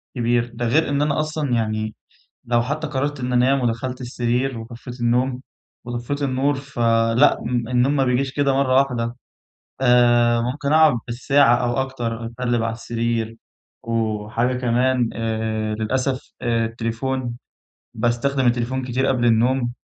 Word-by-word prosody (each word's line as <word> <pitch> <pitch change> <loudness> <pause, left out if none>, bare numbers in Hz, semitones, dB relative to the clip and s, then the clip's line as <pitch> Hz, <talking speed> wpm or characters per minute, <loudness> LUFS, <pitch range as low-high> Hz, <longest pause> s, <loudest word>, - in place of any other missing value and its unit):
كبير 120 0 0
ده 120 +1 -3
غير 155 +7 +2
إن 140 0 0
أنا 150 0 +1
أصلًا 155 -4 -2
يعني 110 -1 -1 0.5
لو 120 0 +2
حتى 150 +5 -3
قررت 145 0 -2
إن 125 0 -2
أنام 130 +3 +3
ودخلت 125 +2 -2
السرير 125 +1 -1
وطفيت 120 +2 -9
النوم، 125 +2 +1 0.4
وطفيت 120 +4 -4
النور 140 +1 +1
فلأ 120 -1 +2
النوم 125 +3 +1
ما 135 - +3
بيجيش 130 +1 0
كده 140 -1 +1
مرة 135 -1 +2
واحدة، 125 -3 +1 0.6
آآ، 120 -2 +4
ممكن 140 +4 -2
أقعد 155 -3 +6
بالساعة 120 +1 +3
أو 120 -1 -1
أكتر 120 -3 -4
أتقلب 120 0 -1
على 115 - -1
السرير، 115 0 -2 0.5
وحاجة 115 +2 -1
كمان 125 0 +1
آآ 110 -1 -2
للأسف 130 +5 -2
آآ 115 -1 +1
التليفون 120 +2 -3 0.6
باستخدم 130 +3 0
التليفون 120 +2 0
كتير 130 +1 0
قبل 125 -2 +1
النوم، 120 +2 +2
120 Hz, 135 wpm, -21 LUFS, 115-130 Hz, 0.6 s, أقعد